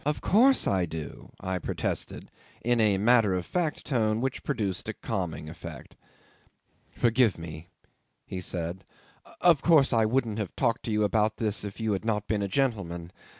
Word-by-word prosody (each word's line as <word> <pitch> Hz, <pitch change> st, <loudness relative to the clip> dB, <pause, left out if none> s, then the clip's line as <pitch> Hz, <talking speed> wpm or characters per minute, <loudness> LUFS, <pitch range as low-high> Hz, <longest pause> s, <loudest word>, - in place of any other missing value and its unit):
"Of 150 Hz, +1 st, -1 dB
course 255 Hz, +7 st, +4 dB
I 95 Hz, -3 st, +1 dB
do," 80 Hz, -2 st, -7 dB
I 95 Hz, -1 st, -2 dB
protested, -, -, -4 dB, 0.3 s
in 120 Hz, -1 st, +3 dB
a 105 Hz, -3 st, +3 dB
matter 110 Hz, -2 st, +4 dB
of 90 Hz, -1 st, -2 dB
fact 170 Hz, -4 st, -2 dB
tone 110 Hz, -5 st, +1 dB
which 130 Hz, +1 st, -2 dB
produced 100 Hz, -3 st, -2 dB
a -, -, -2 dB
calming 85 Hz, -8 st, -4 dB
effect. 85 Hz, -3 st, -9 dB, 0.9 s
"Forgive 115 Hz, -2 st, +2 dB
me," 80 Hz, 0 st, -8 dB, 0.6 s
he 90 Hz, -, -5 dB
said. 90 Hz, +1 st, -4 dB, 0.6 s
"Of 170 Hz, -5 st, +5 dB
course 155 Hz, -6 st, +5 dB
I 110 Hz, -1 st, +4 dB
wouldn't 115 Hz, -2 st, 0 dB
have 105 Hz, -4 st, -4 dB
talked 115 Hz, -3 st, +1 dB
to 115 Hz, -, -2 dB
you 105 Hz, 0 st, +2 dB
about 105 Hz, +1 st, +2 dB
all 110 Hz, -, -4 dB
this 105 Hz, -1 st, 0 dB
if 100 Hz, +1 st, -7 dB
you 110 Hz, -1 st, 0 dB
had 95 Hz, -, -2 dB
not 105 Hz, -2 st, -1 dB
been 105 Hz, -2 st, 0 dB
a 100 Hz, -, 0 dB
gentleman. 95 Hz, -9 st, -1 dB
105 Hz, 175 wpm, -28 LUFS, 90-120 Hz, 0.9 s, Of